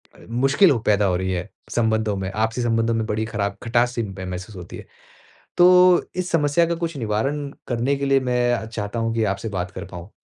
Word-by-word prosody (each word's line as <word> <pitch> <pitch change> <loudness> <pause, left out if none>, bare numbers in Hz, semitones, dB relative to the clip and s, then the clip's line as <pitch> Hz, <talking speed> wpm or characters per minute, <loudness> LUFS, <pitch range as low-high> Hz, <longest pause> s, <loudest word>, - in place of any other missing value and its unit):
अ, - - -18
मुश्किल 135 - +3
पैदा 105 -1 +3
हो 90 -2 +1
रही 95 0 -2
है, 90 +3 -3 0.2
संबंधों 110 -3 +1
में, 95 0 -3
आपसी 110 +3 -1
संबंधों 115 -1 +1
में 110 -1 -1
बड़ी 110 +1 -1
खराब 100 -3 -3
खटास 120 +1 +2
सी 115 - -1
मह 95 -2 -7
महसूस 90 +3 -7
होती 90 -1 -9
है। - - -11 0.7
तो 180 0 +6
इस 185 0 -3
समस्या 165 +1 +3
का 170 0 -1
कुछ 165 -3 -4
निवारण 135 +6 -1 0.2
करने 125 +3 0
के 140 - -2
लिए 135 0 +4
मैं 125 -1 +1
अ, 110 -2 -2
चाहता 110 0 -4
हूँ 115 0 -1
कि 115 - +1
आपसे 100 +2 -2
बात 90 -2 -4
कर 95 +2 -7
पाऊँ। 90 0 -10
115 Hz, 215 wpm, -22 LUFS, 100-135 Hz, 0.7 s, तो